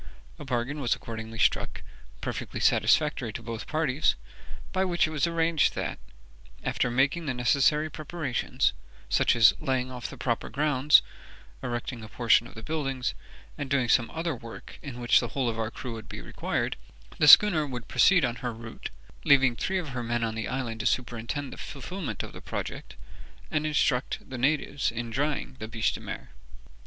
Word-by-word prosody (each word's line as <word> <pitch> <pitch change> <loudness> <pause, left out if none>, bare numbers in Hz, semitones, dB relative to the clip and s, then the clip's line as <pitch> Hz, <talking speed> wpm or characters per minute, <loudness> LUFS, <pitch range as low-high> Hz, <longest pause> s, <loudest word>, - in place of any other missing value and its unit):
A 150 - -7
bargain 130 +3 -2
was 120 -3 +2
accordingly 110 0 -7
struck, - - +1 0.4
perfectly - - -4
satisfactory 150 -7 +3
to 115 - -6
both 115 -1 -6
parties, 155 -2 +1 0.6
by 190 - +1
which 175 -2 +2
it 155 - -4
was 155 +1 +1
arranged 165 -2 +2
that, - - -3 0.6
after 125 - 0
making 135 +7 +1
the 130 - -1
necessary 140 +5 +3
preparations, 155 -4 -1 0.4
such - - +3
as 115 -3 +7
laying 130 -1 -1
off 125 -4 -5
the - - -10
proper - - -1
grounds, 145 +1 +4 0.6
erecting 120 -1 -4
a 110 - -9
portion 120 0 +3
of - - -15
the 110 - -9
buildings, 135 -4 -2 0.5
and 140 -2 -3
doing 130 -3 +2
some 120 0 +3
other 165 0 -2
work 115 -2 -10
in 130 -4 -7
which 120 -1 +5
the 120 - -2
whole 130 +2 -1
of 115 -1 -2
our 110 -1 -1
crew 120 +1 -6
would 110 -1 -9
be - - -6
required, - - -2 0.4
the 150 - +4
schooner 155 -3 +8
should 125 -2 -6
proceed 180 -7 +5
on 120 0 -2
her 125 0 -3
route, 115 0 -8 0.3
leaving 135 -3 +5
three 190 +10 -1
of 175 -5 -3
her 125 -2 -4
men 120 0 -1
on 110 -1 -1
the 110 0 -3
island 125 -4 -3
to 110 - 0
superintend 125 +3 -2
the - - -10
fulfilment 175 +5 -5
of - - -8
the - - -10
project, - - -6 0.6
and 155 0 0
instruct 140 -4 0
the 130 -2 -6
natives 140 +1 +1
in 115 0 -5
drying 135 0 -2
the 110 - -5
biche 115 0 0
de - - -5
mer. - - -7
130 Hz, 180 wpm, -28 LUFS, 120-150 Hz, 0.6 s, schooner